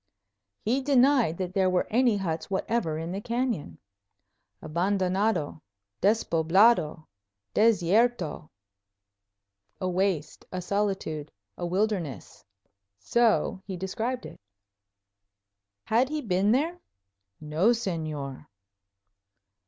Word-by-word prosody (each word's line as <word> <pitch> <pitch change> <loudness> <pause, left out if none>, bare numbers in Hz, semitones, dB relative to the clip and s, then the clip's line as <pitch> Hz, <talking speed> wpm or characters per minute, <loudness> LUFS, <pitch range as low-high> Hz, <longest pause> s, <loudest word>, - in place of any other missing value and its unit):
He 250 +5 +1
denied 260 - +3
that 185 -1 -4
there 190 -1 +3
were 180 -1 +1
any 240 -1 +3
huts 165 -3 -3
whatever 190 -4 -1
in 165 +2 -4
the 195 +2 -4
canyon. 235 - -2 0.8
"Abandonado; 185 0 0 0.4
despoblado; 175 -3 +3 0.5
desierto." 210 -5 +2 1.3
"A 185 - -2
waste; 180 -4 -1
a 185 - -3
solitude; 185 -6 -2 0.2
a 175 - -4
wilderness." 185 - -2 0.5
So 230 - +1
he 190 -2 -4
described 225 +7 -3
it. - - -11 1.4
Had 240 +4 +2
he 305 0 -2
been 200 -4 +1
there? 320 +8 +1 0.6
"No, 155 +6 0
Señor." 155 - -3
190 Hz, 90 wpm, -27 LUFS, 165-230 Hz, 1.4 s, denied